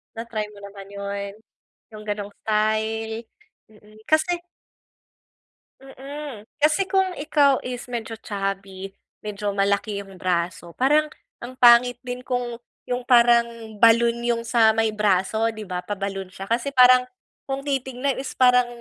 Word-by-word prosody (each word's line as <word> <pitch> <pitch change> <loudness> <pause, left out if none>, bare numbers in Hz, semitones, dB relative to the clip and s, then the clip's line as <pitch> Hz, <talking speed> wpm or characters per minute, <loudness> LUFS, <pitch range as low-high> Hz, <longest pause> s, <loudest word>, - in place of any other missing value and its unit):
Na-try 225 -1 -4
mo 205 - -14
naman 200 -1 -10
yun? 200 0 -5 0.6
Yung 215 0 -9
ganong 205 -1 -4
style? 220 +1 -1 0.4
Mm 215 0 -19
kasi 330 +3 +2 1.4
Hmm. 270 -3 -9 0.2
Kasi 305 +6 +3
kung 380 -2 +2
ikaw 285 -2 +2
is 250 -1 -6
medyo 230 -2 -5
chubby, 195 -2 -5 0.3
medyo 205 -1 -3
malaki 200 +1 0
yung 195 -2 -15
braso. 175 -1 -2
Parang 300 +4 +3 0.3
ang 250 +2 -9
pangit 245 0 +6
din 250 0 -5
kung 245 -2 -3 0.2
yung 245 0 -4
parang 235 -1 +5 0.3
balloon 235 +1 +5
yung 235 -1 0
sa 225 -2 +3
may 225 -1 +2
braso 210 +1 +1
di 215 - -7
ba? 180 -3 -4
Pa 195 +3 -5
balloon 195 -1 -4
siya. 195 +3 -10
Kasi 245 +4 -1
parang 250 0 +7 0.4
kung 270 0 -3
titignan 265 -1 -2
is 270 - -6
parang 250 -1 +5
230 Hz, 135 wpm, -23 LUFS, 205-250 Hz, 1.4 s, parang